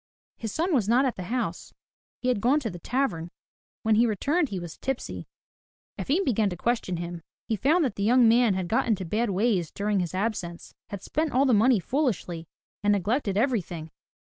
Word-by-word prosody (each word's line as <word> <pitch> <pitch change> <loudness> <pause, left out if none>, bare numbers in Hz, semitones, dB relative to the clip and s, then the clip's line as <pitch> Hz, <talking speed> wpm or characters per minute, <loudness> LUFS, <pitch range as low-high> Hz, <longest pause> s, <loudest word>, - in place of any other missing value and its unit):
His 225 -2 -5
son 340 - 0
was 225 -7 +2
not 250 +4 +4
at 255 - 0
the 185 - -6
house. 215 -6 -3 0.5
He 255 - +2
had 245 -5 +1
gone 260 +6 +3
to 225 -6 -3
the 175 - -8
tavern. 175 -7 -1 0.5
When 220 -1 +3
he 230 +3 +4
returned 285 - +1
he 195 - -4
was 175 -2 -7
tipsy. 270 -2 -4 0.7
Efim 335 +8 +1
began 220 -6 +2
to 180 - -6
question 225 -4 -1
him. 170 0 -5 0.3
He 225 - 0
found 305 - +3
that 240 - -3
the - - -3
young 240 +2 +5
man 230 -3 +4
had 185 -2 -2
got 225 +7 +1
into 200 -5 0
bad 220 +7 0
ways 195 -4 +1
during 205 0 -1
his 175 -1 -2
absence, 185 -4 -3 0.2
had 200 -3 -7
spent 310 -1 -1
all 265 +3 +3
the 260 - +3
money 225 +2 +5
foolishly 185 - -2 0.3
and 205 0 +3
neglected 205 +1 0
everything. 180 - -1
220 Hz, 195 wpm, -26 LUFS, 185-255 Hz, 0.7 s, young